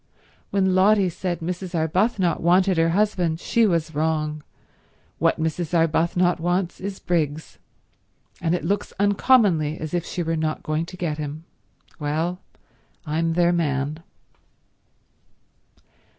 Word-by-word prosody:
When 190 -2 +1
Lotty 195 0 +4
said 175 0 -4
Mrs. 180 +2 -4
Arbuthnot 180 +3 +1
wanted 180 +2 +3
her 165 0 +3
husband, 180 -4 +1
she 230 +4 +2
was 165 -4 0
wrong. 155 0 -1 0.8
What - - +2
Mrs. 160 +1 -2
Arbuthnot 170 +2 +2
wants 175 +2 -1
is 195 0 -5
Briggs, 160 -3 -2 0.8
and 170 +1 +1
it 175 - -4
looks 200 +4 -1
uncommonly 200 - +3
as 155 0 -6
if 175 -2 0
she 175 0 -4
were 165 0 -1
not 155 -1 -2
going 155 +2 -2
to 185 - -10
get 155 -4 -3
him. 150 +1 -5 0.6
Well, 160 +4 -2 0.7
I'm 165 +2 0
their 175 +1 +3
man." 150 -2 -1
170 Hz, 125 wpm, -23 LUFS, 160-185 Hz, 0.8 s, Lotty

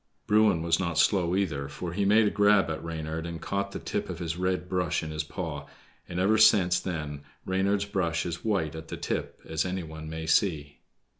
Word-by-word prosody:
Bruin 105 -5 +4
was 85 -1 +2
not 85 -3 -2
slow 90 +1 +3
either, 80 -8 -1
for 85 +4 -5
he 100 +2 0
made 105 +2 +5
a 105 - +2
grab 100 -5 +4
at 80 - -5
Reynard 80 0 -4
and 85 -1 -5
caught 100 +2 -2
the - - -5
tip 105 - -3
of 90 - -4
his 85 -1 -3
red 90 0 -1
brush 90 -2 0
in 80 - -5
his 75 0 -2
paw; 75 -3 -5 0.4
and 85 - -3
ever 105 +4 +3
since 100 -5 +5
then 75 -5 -4 0.2
Reynard's 100 +2 +1
brush 85 -4 -1
is 85 -1 -4
white 95 -9 0
at 80 0 -8
the - - -6
tip, - - -3
as 80 -1 0
any 90 0 -3
one 80 -1 -8
may 80 0 -5
see. 80 -3 +1
85 Hz, 210 wpm, -28 LUFS, 80-100 Hz, 0.4 s, made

